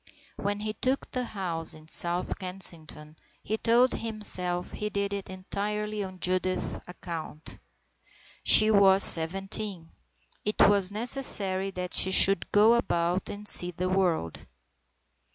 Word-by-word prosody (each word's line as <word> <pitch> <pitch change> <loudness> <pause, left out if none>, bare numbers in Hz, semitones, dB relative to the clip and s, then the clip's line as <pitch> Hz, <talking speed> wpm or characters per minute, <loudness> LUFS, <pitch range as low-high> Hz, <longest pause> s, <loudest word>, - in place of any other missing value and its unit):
When 205 +1 -5
he 215 0 -5
took 260 +5 -4
the 250 -1 -4
house 175 -7 -5
in 155 0 -17
South 175 +4 -3
Kensington 160 -5 -5 0.3
he 215 - -4
told 240 +3 +1
himself 185 -5 -3
he 210 - -6
did 200 -1 -4
it 200 -1 -7
entirely 210 +3 -6
on 185 -1 -11
Judith's 185 0 -3
account. 165 -3 -10 0.8
She 215 0 +7
was 195 -2 +4
seventeen. 190 +1 +1 0.5
It 210 - -3
was 200 -2 +2
necessary 205 -4 +1
that 180 -1 -8
she - - +3
should 190 -1 +5
go 215 +3 +3
about 175 -6 -2
and 205 +1 -9
see 180 -3 +9
the 180 +1 -5
world. 175 - -3
195 Hz, 130 wpm, -25 LUFS, 180-210 Hz, 0.8 s, see